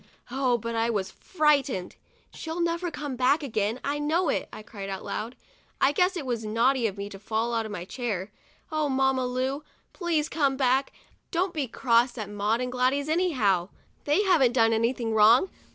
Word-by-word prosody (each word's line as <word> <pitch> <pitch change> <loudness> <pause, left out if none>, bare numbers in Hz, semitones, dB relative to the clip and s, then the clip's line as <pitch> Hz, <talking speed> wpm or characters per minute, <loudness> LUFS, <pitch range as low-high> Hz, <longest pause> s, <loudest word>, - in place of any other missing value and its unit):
Oh, 255 -2 +1
but 230 +1 -5
I 230 0 +1
was 195 -4 -2
frightened! 280 - 0 0.2
" - - -35
She'll 325 +2 -5
never 340 +1 0
come 295 -4 -5
back 265 +5 +2
again, 220 -2 -1
I 290 +1 -1
know 320 +3 +1
it!' - - -1
I 215 - -9
cried 200 -2 -8
out 190 -1 -5
loud. 230 +4 -4 0.2
' - - -34
I 270 - +4
guess 360 +5 +2
it 305 - -4
was 240 -3 -2
naughty 230 +3 +2
of 200 -1 -6
me 200 0 -4
to 195 - -10
fall 220 +3 -2
off 225 -1 -1
my 180 -4 -6
chair. 210 -4 -4 0.4
Oh, 310 -2 0
Mamma 265 -1 +1
Lu, 260 +3 -2 0.3
please 330 -5 0
come 280 -5 0
back! 265 0 +2 0.4
don't 360 +1 0
be 290 -4 -2
cross 240 +1 +2
at 210 -2 -5
Maud 210 +3 0
and 250 0 -2
Gladys, 255 +3 +1
anyhow; 250 - +1 0.4
they 295 +8 +3
haven't 310 - +4
done 225 -2 +4
anything 230 0 0
wrong. 225 - +5
255 Hz, 190 wpm, -27 LUFS, 225-295 Hz, 0.4 s, wrong